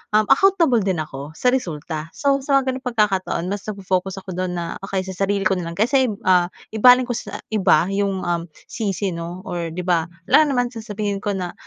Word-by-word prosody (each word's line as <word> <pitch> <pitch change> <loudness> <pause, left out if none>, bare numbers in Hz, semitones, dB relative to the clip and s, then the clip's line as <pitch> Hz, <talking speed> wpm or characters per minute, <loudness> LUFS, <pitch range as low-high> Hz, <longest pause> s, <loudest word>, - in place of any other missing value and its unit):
uhm, 215 - +5
accountable 335 -6 +4
din 190 -6 0
ako 145 +1 -9
sa 250 - +2
resulta. 160 - -3
So, 275 -1 +2
sa 275 +1 0
mga 265 -1 +2
ganoong 260 0 -6
pagkakataon 210 -7 0
mas 205 +1 -5
nagfo-focus 190 -2 -2
ako 185 - -7
do'n 180 0 -3
na, 170 -1 -3
okey 195 -1 -3
sa 190 +1 -2
sarili 200 -1 0
ko 190 -1 +1
na 170 - -4
lang, 170 - -6
kaysa 255 +6 +3 0.2
ah, 180 -1 +4 0.2
ibaling 250 +3 +6
ko 245 - -2
sa - - -6
iba 185 -7 +4
'yong 195 -2 0
uhm, 170 -1 -1 0.2
sisi, 200 -3 -2
'no, 170 +1 -6
or 170 -2 -4
'di 180 - -3
ba, 170 -2 +1 0.2
alangan 310 0 +6
namang 245 -1 +1
sasabihin 210 -2 -3
ko 205 0 -2
na 180 -2 -4
195 Hz, 205 wpm, -21 LUFS, 175-235 Hz, 0.2 s, ibaling